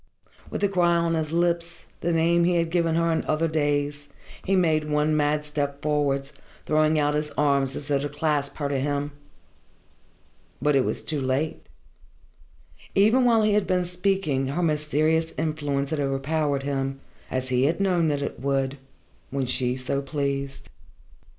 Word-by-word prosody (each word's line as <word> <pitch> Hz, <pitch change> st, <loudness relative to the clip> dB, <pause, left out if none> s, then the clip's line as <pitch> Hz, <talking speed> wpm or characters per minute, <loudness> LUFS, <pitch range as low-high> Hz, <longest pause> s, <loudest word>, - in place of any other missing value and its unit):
With -, -, -4 dB
the 200 Hz, -, +4 dB
cry 175 Hz, -3 st, +2 dB
on 170 Hz, 0 st, +1 dB
his 155 Hz, -2 st, -1 dB
lips 170 Hz, 0 st, 0 dB
the 170 Hz, -, -1 dB
name 170 Hz, +1 st, +3 dB
he 175 Hz, +1 st, +2 dB
had 165 Hz, -1 st, +1 dB
given 165 Hz, -2 st, +1 dB
her 165 Hz, 0 st, +2 dB
in 160 Hz, -, 0 dB
other 155 Hz, +2 st, +1 dB
days 145 Hz, -2 st, -1 dB, 0.3 s
he 195 Hz, -, +1 dB
made 155 Hz, -4 st, +2 dB
one 150 Hz, +1 st, +2 dB
mad 150 Hz, 0 st, +1 dB
step 145 Hz, -1 st, -3 dB
forwards, 145 Hz, -2 st, 0 dB, 0.3 s
throwing 155 Hz, 0 st, +3 dB
out 145 Hz, 0 st, +2 dB
his 150 Hz, 0 st, -1 dB
arms 140 Hz, -2 st, +2 dB
as 145 Hz, -, -5 dB
though 140 Hz, -2 st, +1 dB
to 145 Hz, +1 st, -3 dB
clasp 145 Hz, -1 st, -1 dB
her 145 Hz, -, -1 dB
to 140 Hz, -1 st, -1 dB
him. 145 Hz, +1 st, -1 dB, 1.5 s
But 145 Hz, +2 st, +2 dB
it 135 Hz, -, +3 dB
was -, -, -2 dB
too 150 Hz, -3 st, -2 dB
late. 135 Hz, +4 st, -2 dB, 1.3 s
Even 220 Hz, +6 st, +4 dB
while 230 Hz, -2 st, +4 dB
he 210 Hz, -1 st, +3 dB
had 205 Hz, -2 st, +2 dB
been 180 Hz, -1 st, +1 dB
speaking 180 Hz, -7 st, 0 dB
her 150 Hz, +6 st, -1 dB
mysterious 155 Hz, +1 st, +1 dB
influence 145 Hz, -3 st, -1 dB
had 155 Hz, -, -1 dB
overpowered 140 Hz, +1 st, 0 dB
him, 135 Hz, -1 st, -2 dB, 0.3 s
as 130 Hz, 0 st, -2 dB
he 125 Hz, +1 st, +2 dB
had 165 Hz, +5 st, +1 dB
known 180 Hz, -4 st, +2 dB
that 145 Hz, -2 st, 0 dB
it -, -, -5 dB
would, 135 Hz, +1 st, -1 dB, 0.5 s
when 135 Hz, -1 st, -1 dB
she 125 Hz, 0 st, 0 dB
so 130 Hz, +2 st, -2 dB
pleased. 140 Hz, -1 st, -3 dB
150 Hz, 170 wpm, -25 LUFS, 140-165 Hz, 1.5 s, the